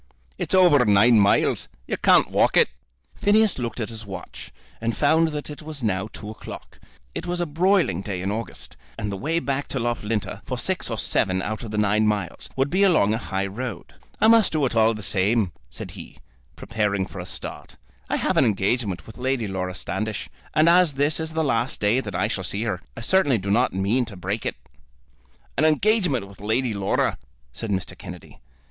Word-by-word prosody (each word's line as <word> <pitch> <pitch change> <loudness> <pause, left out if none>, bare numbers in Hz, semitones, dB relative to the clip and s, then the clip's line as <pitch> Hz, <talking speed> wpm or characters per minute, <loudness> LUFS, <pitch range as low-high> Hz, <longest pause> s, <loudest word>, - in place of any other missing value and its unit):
"It's - - 0
over 175 -8 +6
nine 110 +2 +5
miles. 100 0 +3 0.2
You - - -2
can't - - +4
walk - - +3
it." - - +6 0.4
Phineas 210 -4 +3
looked 120 -1 -4
at 110 - -2
his 110 -1 -8
watch, 100 -3 -9 0.3
and 115 0 -1
found 160 +3 +4
that 150 -2 -4
it 145 - -9
was 155 -4 -6
now 95 -2 0
two 105 0 -8
o'clock. 110 - -10 0.3
It - - -5
was 175 0 -2
a 175 - +1
broiling 165 - +2
day 95 -3 -4
in 95 - -1
August, 110 +2 -5 0.2
and 105 - -3
the - - -3
way 155 +11 -1
back 140 -3 -1
to 135 - -3
Loughlinter, 115 -3 -2
for - - -4
six - - -2
or - - -3
seven 95 0 +1
out 110 +1 -3
of 115 - -6
the 105 - -4
nine 105 +1 +3
miles, 105 -4 -2
would 135 +1 0
be 185 +3 +2
along 165 - +4
a 110 - -1
high 95 -3 -2
road. 105 0 -6 0.3
"I 220 - +5
must 225 -3 +6
do 155 -3 +2
it 125 - -2
all 110 0 +4
the 110 - -7
same," 100 +1 +1 0.2
said - - -8
he, - - -11 0.4
preparing 105 -4 -1
for 95 - -9
a 90 - -5
start. - - -6 0.3
"I - - +1
have - - 0
an - - +6
engagement 100 -3 0
with 110 - -12
Lady 130 -3 0
Laura 90 -1 -3
Standish; 110 +2 -3 0.3
and 155 +1 +5
as 170 -4 +5
this 145 +3 +1
is 160 0 -3
the 160 0 +1
last 120 -3 0
day 105 +5 +3
that - - -5
I - - +1
shall - - -3
see 100 +3 -2
her, 115 - -2 0.2
I - - -5
certainly 145 -2 +3
do 100 0 -3
not 120 +5 +3
mean 100 +7 +1
to 105 - -9
break 95 +4 -2
it." - - -2 1.0
"An - - +3
engagement 155 - +2
with 100 0 -15
Lady 110 +3 0
Laura," 100 -1 0 0.3
said 110 - -5
Mr. 95 -2 -2
Kennedy. 90 -1 -11
115 Hz, 205 wpm, -24 LUFS, 100-145 Hz, 1.0 s, over